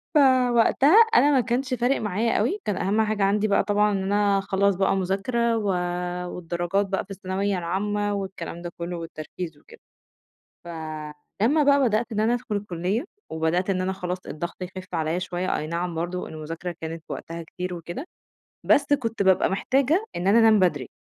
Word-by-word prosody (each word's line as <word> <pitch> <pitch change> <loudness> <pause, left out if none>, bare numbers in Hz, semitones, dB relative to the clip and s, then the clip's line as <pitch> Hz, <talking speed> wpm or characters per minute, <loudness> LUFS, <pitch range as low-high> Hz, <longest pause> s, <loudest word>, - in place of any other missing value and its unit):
فوَقتها 260 - +5 0.2
أنا 290 - +6
ما 265 -3 +4
كانش 255 +3 -1
فارِق 250 +2 +1
معايا 215 +3 0
أوي، 270 - 0
كان 205 - -1
أهم 210 +3 +1
حاجة 215 -2 0
عندي 205 +2 +2
بقى 200 - +3
طبعًا 210 0 +2
إن 195 -1 -1
أنا 200 0 +2
اخلّص 195 0 +1
بقى 195 +1 +2
مذاكرة 225 +5 0
و 210 - -2 0.7
والدراجات 175 +3 -1
بقى 190 -1 -2
في 200 - -14
الثانوية 195 0 -2
العامة 205 +4 -1
والكلام 190 -4 -5
ده 175 -1 -6
كلّه 170 0 -4
والتركيز 165 0 -7
وكده. - - -17 0.9
فلمّا 160 - -2
بقى 280 0 +4
بدأت 230 0 +1
إن 215 - 0
أنا 230 +2 +3
أدخُل 240 -4 -3
الكُلّية 200 - -2 0.3
وبدأت 160 +4 0
إن 185 -1 0
أنا 185 +1 -1
خلاص 180 -1 -4
الضغط 170 +3 -6
يخِف 185 0 -8
عليَّ 160 +2 0
شوية، 180 0 -2
أي 155 - -3
نعم 170 +1 -3
برضه 175 +2 -3
المذاكرة 165 +3 -6
كانت 160 0 -6
وقتها 165 0 -6
كتير 180 +2 -6
وكده، 175 - -7 0.6
بس 290 0 +3
كنت 230 -6 0
بابقى 190 -1 +3
محتاجة 275 - +1
إن 180 - -3
أنا 210 +4 +5
أنام 220 -2 +6
بدري، 150 -9 +1
195 Hz, 170 wpm, -25 LUFS, 175-220 Hz, 0.9 s, أنا